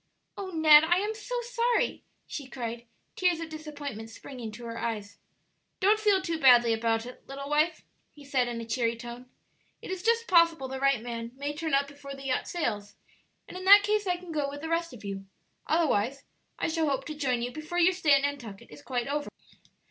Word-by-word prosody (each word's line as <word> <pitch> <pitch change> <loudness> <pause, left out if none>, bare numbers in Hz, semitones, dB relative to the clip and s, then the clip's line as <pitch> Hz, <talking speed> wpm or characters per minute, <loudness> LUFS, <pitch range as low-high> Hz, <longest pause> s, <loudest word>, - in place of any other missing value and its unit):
"Oh, 390 -1 -5
Ned, 315 -3 +7
I 340 +2 +3
am 415 +3 -1
so - - -4
sorry!" 480 0 0 0.2
she 280 -3 -7
cried, 235 -2 -6 0.3
tears 360 -3 +2
of 330 -1 -5
disappointment 290 -8 -7
springing 235 0 -8
to 235 +2 -9
her 230 0 -5
eyes. 210 -3 -4 0.6
"Don't 415 +2 +4
feel 410 -3 +3
too 335 -3 -2
badly 240 -4 +6
about 225 0 0
it, 250 - -11
little 275 +1 -7
wife," 305 +3 +2 0.3
he 290 -1 -15
said, 260 -3 +1
in 235 -1 -4
a 230 - -6
cheery 230 0 0
tone; 240 +1 -9 0.5
"it - - -8
is 375 -1 -4
just 460 +3 +2
possible 335 -6 +4
the 265 0 -5
right 275 -4 +2
man 235 -1 -5
may 285 +2 -3
turn 315 -1 -1
up 280 +1 +2
before 285 -1 -9
the 275 0 -11
yacht 260 -1 -1
sails; 210 -12 -3 0.5
and - - -11
in 370 0 -6
that 405 +1 +9
case 415 0 +1
I 360 -1 +1
can 355 -1 -10
go 295 -3 -1
with 285 +1 -8
the 320 - -5
rest 335 0 0
of 230 -4 -11
you; 195 -1 -6 0.4
otherwise 275 -6 +1 0.3
I - - -1
shall 320 -1 0
hope 270 -1 -1
to 310 - -5
join 255 -5 -1
you 245 - -3
before 310 +5 -6
your 355 +1 +5
stay 325 -5 +3
at 275 0 +4
Nantucket 250 -9 -5
is 150 -1 -12
quite 245 - -2
over." 290 +1 -2
285 Hz, 210 wpm, -28 LUFS, 240-335 Hz, 0.6 s, that